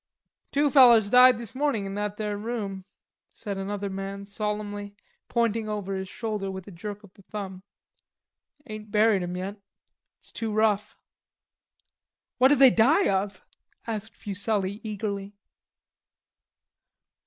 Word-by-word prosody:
"Two 285 0 +2
fellers 235 -6 +7
died 250 -1 +8
this 235 -3 -6
mornin' 260 -7 0
in 195 - -5
that 205 0 -3
there 210 -1 -2
room," 205 -3 -4 0.4
said 200 -3 -6
another 200 +1 -3
man 195 +1 -5
solemnly, 205 0 -4 0.3
pointing 230 -2 0
over 205 -2 -3
his 190 0 -5
shoulder 210 -4 -3
with 190 0 -7
a - - -9
jerk 205 +4 -7
of 200 -2 -16
the 200 - -19
thumb. 190 -2 -7 1.0
"Ain't 215 -3 -8
buried 210 -1 +3
'em 180 0 -4
yet. 195 +3 -5 0.6
It's - - -15
too 225 -1 -4
rough." 210 -1 +1 1.4
"What'd 265 +3 +6
they 265 -1 +8
die 280 - +4
of?" 195 0 -2 0.4
asked 220 -1 -5
Fuselli 200 0 -2
eagerly. 205 -2 -4
210 Hz, 130 wpm, -26 LUFS, 195-225 Hz, 1.4 s, died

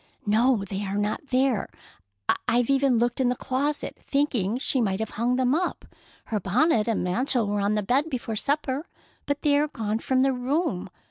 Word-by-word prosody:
"No, 220 +1 +3
they 195 +1 -4
are 200 0 -3
not 210 +7 -2
there. 260 -4 +1 0.8
I've 245 +2 +2
even 270 -2 +3
looked 240 +2 +1
in 250 - +3
the 250 - 0
closet, 275 +4 -2
thinking 245 -7 0
she 260 0 +1
might 195 -3 0
have 220 -1 -3
hung 240 +3 0
them 255 0 +2
up. 355 +4 -1 0.4
Her 215 - -2
bonnet 215 - +2
and 230 - 0
mantle 240 +6 +1
were 205 0 -1
on 205 +1 +1
the 210 - 0
bed 270 +9 +1
before 240 -5 -3
supper, 285 - -1 0.4
but 285 0 -2
they 290 -2 +4
are 300 - +2
gone 220 -5 -2
from 260 +2 +1
the 270 0 +3
room. 250 - -1
245 Hz, 190 wpm, -26 LUFS, 210-275 Hz, 0.8 s, they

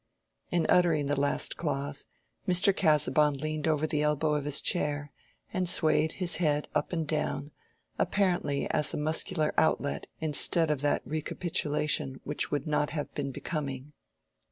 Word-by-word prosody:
In 175 -2 0
uttering 165 -5 +3
the 145 0 -1
last 140 0 +2
clause, 140 -3 -2 0.4
Mr. 185 +2 +5
Casaubon 150 -3 +2
leaned 155 +2 -4
over 155 -1 +1
the 150 -1 -1
elbow 150 0 0
of 145 -1 -2
his 145 -1 +5
chair, 145 -4 -1 0.4
and 185 -2 -1
swayed 155 -1 +3
his 180 -2 +1
head 150 -4 0
up 150 -1 -1
and 165 -3 -3
down, 145 -2 -2 0.5
apparently 175 -7 0
as 150 -1 +2
a - - -3
muscular 155 +1 0
outlet 145 -2 0
instead 160 +1 +3
of 145 -3 -2
that 145 - 0
recapitulation 150 -3 -1
which 150 - -2
would 145 - -2
not 150 -1 0
have 145 -1 -4
been 140 -2 -3
becoming. 140 0 -5
150 Hz, 150 wpm, -28 LUFS, 145-160 Hz, 0.5 s, Mr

